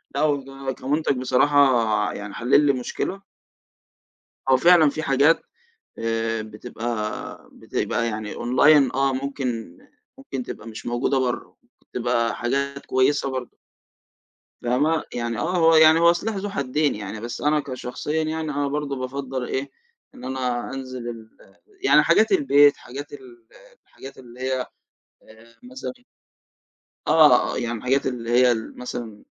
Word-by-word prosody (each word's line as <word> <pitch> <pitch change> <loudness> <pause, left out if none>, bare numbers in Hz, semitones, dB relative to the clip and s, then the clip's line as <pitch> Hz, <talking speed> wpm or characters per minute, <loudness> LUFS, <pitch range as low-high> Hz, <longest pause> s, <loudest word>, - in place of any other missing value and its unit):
لأ، 145 - 0
هو 135 -2 -1
كمنتج 140 0 -1
بصراحة 125 -5 +3
يعني 100 -1 -7
حل 125 +5 +3
لي 140 - +4
مشكلة. 135 +9 -4 1.3
هو 130 - +6
فعلًا 170 0 +6
في 155 +2 -5
حاجات 140 +4 +3 0.6
آآ، 115 0 -1
بتبقى 110 +1 -6
بتبقى 115 - -2
يعني 110 -1 -5
أونلاين 135 +3 +4
آه، 135 0 +1
ممكن 130 -8 -4 0.4
ممكن 135 -1 -6
تبقى 115 - -9
مش 110 - -9
موجودة 120 +3 0
برّه، 125 -2 -3 0.2
وبتبقى 120 -2 -1
حاجات 140 +3 -2
كويّسة 135 +2 +1
برضو. 130 -2 -6 1.0
فاهمه؟ 145 +7 +1
يعني 120 -1 -3
آه، 180 +8 -1
هو 165 -1 +5
يعني 160 +1 +7
هو 170 0 +6
سلاح 210 +5 -3
ذو 200 +1 -3
حدين 145 - 0
يعني، 105 +1 -6
بس 120 0 -6
أنا 150 +1 +2
كشخصيًا 140 +4 -3
يعني 155 0 -3
آه، 145 0 -1
برضو 140 -2 -3
بافضّل 130 0 -4
إيه، 135 +2 -3 0.4
إن - - -13
أنا 125 -2 -2
أنزل 130 -2 -6
ال 115 -1 -9 0.5
يعني - - +6
حاجات - - +3
البيت 145 - +5
حاجات 140 +5 -9
ال 120 -4 -13 0.4
الحاجات 135 +1 -12
اللي 125 -1 -14
هي 130 0 -1 0.4
آآ، 115 +1 -21
مثلًا 255 0 -7 1.1
آه، 150 -5 +5
يعني 120 0 -2
الحاجات 130 +4 0
اللي 120 -3 -3
هي 125 +1 +5
ال 110 -2 -4
مثلًا 115 -4 -7
130 Hz, 135 wpm, -23 LUFS, 120-145 Hz, 1.3 s, يعني